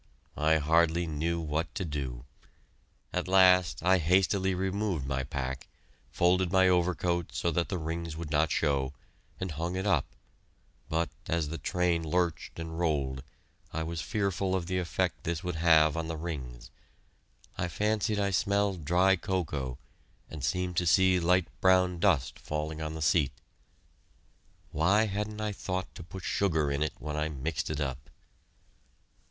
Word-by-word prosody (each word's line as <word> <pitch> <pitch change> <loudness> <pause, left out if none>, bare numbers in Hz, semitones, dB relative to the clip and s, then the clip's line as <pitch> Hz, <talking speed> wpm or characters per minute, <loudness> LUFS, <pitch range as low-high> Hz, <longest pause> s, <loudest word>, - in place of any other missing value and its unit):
I 80 +1 +3
hardly 80 +3 +3
knew 80 +2 -1
what 80 -1 -3
to 95 - -2
do. 65 -5 -4 0.9
At 90 0 -1
last 90 -5 +5
I 95 +1 +4
hastily 95 +3 +2
removed 95 -4 -1
my 65 0 -1
pack, 65 -1 -4 0.4
folded 90 +6 +2
my 95 -1 +5
overcoat 90 -1 +1
so 85 - 0
that 85 +2 0
the 95 - -1
rings 80 0 -4
would 80 -2 -6
not 80 +2 +2
show, 70 -3 0 0.5
and 95 -2 -3
hung 85 +4 -3
it 95 +1 -2
up, 80 -9 +2 0.8
but 80 -1 0 0.2
as 80 -3 0
the 80 - -5
train 90 -2 +1
lurched 85 0 -1
and 80 0 -5
rolled, 70 -6 0 0.5
I 80 - -2
was 80 0 -4
fearful 95 -1 -1
of 90 -3 -1
the 90 +1 -1
effect 85 -3 -1
this 85 -2 -2
would 90 -2 -3
have 80 -2 +5
on 80 -1 -2
the 80 -1 -4
rings. 65 -8 -6 0.8
I 90 - -2
fancied 105 +4 0
I 100 -1 +1
smelled 100 -2 +1
dry 90 +5 +4
cocoa, 75 -9 -3 0.5
and 75 -4 -7
seemed 90 +5 -1
to 90 - +2
see 95 +1 +5
light 90 +1 +3 0.2
brown 90 -1 +4
dust 80 -11 +2
falling 75 +1 -4
on 80 0 -4
the 80 - -3
seat. 70 -3 +2 1.4
Why 100 +8 +3
hadn't 105 +1 -3
I 105 0 -1
thought 95 -2 -4
to - - -9
put 95 +2 -9
sugar 80 -7 +1
in 70 +1 -1
it 75 - 0
when 75 0 -5
I 75 +1 -1
mixed 75 +1 -3
it 75 -1 -3
up? 65 -2 -4
85 Hz, 160 wpm, -29 LUFS, 75-90 Hz, 1.4 s, last